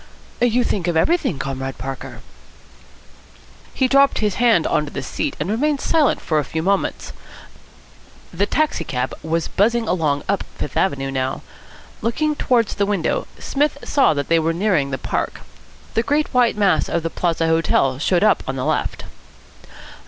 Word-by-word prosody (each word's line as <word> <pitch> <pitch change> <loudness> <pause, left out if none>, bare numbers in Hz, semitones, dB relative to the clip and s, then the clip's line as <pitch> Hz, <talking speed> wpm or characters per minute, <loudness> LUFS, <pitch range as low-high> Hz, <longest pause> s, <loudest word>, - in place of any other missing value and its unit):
"You 245 0 +3
think 190 -6 -1
of 170 -2 +1
everything, 275 - +1
Comrade 135 0 -4
Parker." 135 0 -7 1.5
He 260 - +1
dropped 275 +1 +4
his 210 -2 0
hand 230 -9 +4
on 150 -2 +1
to - - -8
the 135 - -5
seat, - - -3
and 150 - -2
remained 275 +8 0
silent 310 -2 +2
for 155 -2 0
a - - 0
few 160 +4 -4
moments. 195 +2 -1 1.2
The 195 +4 0
taxi 310 0 0
cab 125 -1 -3
was 165 +1 -1
buzzing 225 +3 +1
along 150 -5 0
up 200 -1 0
Fifth 145 - -5
Avenue 135 -7 0
now. 130 0 -2 0.6
Looking 300 +7 0
towards 240 -6 +1
the 200 -1 0
window, 195 -6 -1
Psmith 290 0 0
saw 275 - +3
that 140 -1 -2
they 165 0 +3
were 165 +1 0
nearing 175 -6 +1
the 130 - -2
park. - - -3 0.5
The 225 - +2
great 290 +5 0
white 245 -4 +3
mass 200 -3 +2
of 170 - -1
the 165 - -2
Plaza 165 -2 0
Hotel 160 -5 +2
showed 175 +5 +2
up 215 - +4
on 135 - -2
the 130 - -3
left. - - -1
180 Hz, 165 wpm, -20 LUFS, 150-235 Hz, 1.5 s, dropped